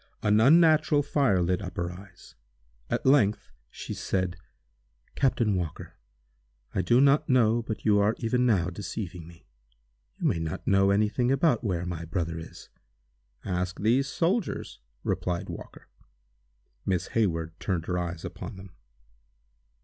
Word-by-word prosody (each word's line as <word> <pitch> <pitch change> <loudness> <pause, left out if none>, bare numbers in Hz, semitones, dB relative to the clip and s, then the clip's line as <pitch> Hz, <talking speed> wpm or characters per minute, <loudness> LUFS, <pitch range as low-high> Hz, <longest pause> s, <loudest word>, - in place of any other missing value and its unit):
An 105 0 +4
unnatural 155 +1 +5
fire 135 -11 +2
lit 90 +3 0
up 90 0 -7
her 85 -1 -2
eyes. 90 0 -14 0.6
At - - -2
length 130 -7 +3 0.2
she - - -7
said: 95 -2 -2 0.8
"Captain 120 -6 +1
Walker, 85 -4 -4 0.8
I - - +1
do 120 +8 +3
not 140 +2 +4
know 120 -3 +3
but 110 -1 -6
you 105 -2 +4
are 105 +2 +2
even 125 +2 0
now 95 -8 +2
deceiving 90 -3 -6
me. 85 0 -16 0.7
You - - -4
may 85 - +1
not 80 -1 -4
know 95 0 +4
any 105 +2 +3
thing 125 +4 0
about 135 -3 +2
where 90 -5 -1
my 85 -2 -4
brother 85 -1 -3
is." 80 - -11 0.8
"Ask 90 0 -2
these 125 +6 +2
soldiers," 180 - -1 0.2
replied 90 -1 -2
Walker. - - -10 1.0
Miss 95 -3 -1
Hayward 85 -7 -1
turned 90 -4 -2
her 90 -1 -1
eyes 85 -2 -4
upon 110 - -7
them. 95 -1 -12
100 Hz, 140 wpm, -27 LUFS, 90-125 Hz, 1.0 s, unnatural